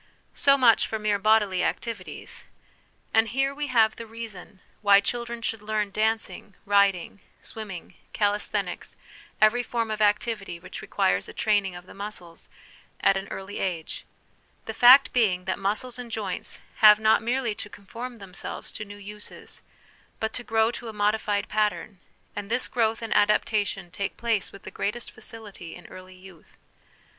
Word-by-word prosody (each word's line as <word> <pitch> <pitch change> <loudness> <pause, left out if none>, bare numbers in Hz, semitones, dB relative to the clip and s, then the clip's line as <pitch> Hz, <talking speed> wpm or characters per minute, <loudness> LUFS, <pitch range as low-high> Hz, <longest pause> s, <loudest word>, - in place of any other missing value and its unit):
So 280 0 +4
much 240 -4 +5
for 220 - -2
mere 210 -1 0
bodily 210 -3 +3
activities. 225 -6 -4 0.7
And 225 0 +5
here 270 +2 +1
we 295 +1 -3
have 225 -4 +3
the 230 - -7
reason 220 -4 -9 0.2
why 200 -1 +7
children 235 +2 -4
should 225 -1 -2
learn 210 -1 -1
dancing, 220 -1 -1
riding, 200 -2 +2 0.2
swimming, 210 -6 -8 0.2
calisthenics, 205 -1 -1 0.4
every 215 +3 +5
form 230 -2 -2
of 215 0 -3
activity 205 -3 +1
which - - -9
requires 95 +1 0
a - - -9
training 205 -4 +1
of 175 0 -10
the - - -13
muscles, 195 -4 -8 0.5
at 195 - +4
an 195 +1 -3
early 195 +1 -6
age: 170 -4 -3 0.6
the 220 - -4
fact 250 +4 +8
being, 190 -7 +2
that 190 - -2
muscles 215 +6 -2
and 240 -2 -7
joints 205 -5 -4 0.2
have 210 -1 +8
not 220 0 +4
merely 240 0 0
to 205 - -8
conform 235 +5 -8
themselves 195 -3 -7
to - - -6
new 205 -1 -10
uses, 210 +1 -10 0.6
but 220 - -2
to 250 - -4
grow 225 0 +2
to 240 - -7
a - - -7
modified 210 0 0
pattern; 210 -2 -1 0.4
and 205 0 -5
this 245 +2 0
growth 225 -2 0
and 225 - -1
adaptation 205 -3 +1
take 195 +4 -4
place 230 -4 0
with 200 - -13
the - - -8
greatest 220 +4 -3
facility 215 -6 -9
in 175 - -13
early 185 0 -12
youth. 185 -3 -16
210 Hz, 160 wpm, -26 LUFS, 195-225 Hz, 0.7 s, fact